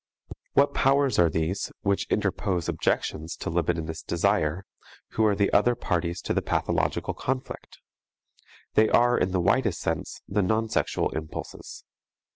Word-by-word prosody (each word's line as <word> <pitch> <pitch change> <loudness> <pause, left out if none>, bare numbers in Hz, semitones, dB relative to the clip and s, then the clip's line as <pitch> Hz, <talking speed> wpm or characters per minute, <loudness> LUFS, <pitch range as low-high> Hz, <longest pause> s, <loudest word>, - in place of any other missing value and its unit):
What 140 +1 +4
powers 135 -2 +2
are 85 -1 +5
these 80 +5 -2
which 100 -1 0
interpose 90 -5 -1
objections 80 +2 -1
to - - -5
libidinous 85 -1 -1
desire, 90 -1 0 0.4
who 110 - 0
are 105 - +2
the 100 0 +1
other 120 +4 +4
parties 85 -3 -2
to - - -1
the - - +1
pathological - - -1
conflict? 130 0 -5 1.0
They 110 0 +4
are, 120 0 +4
in 95 - +1
the 95 - +1
widest 105 +1 +1
sense, - - -3
the 100 +1 +1
non 110 +4 0
sexual - - 0
impulses. 80 0 -7
95 Hz, 140 wpm, -26 LUFS, 85-110 Hz, 1.0 s, are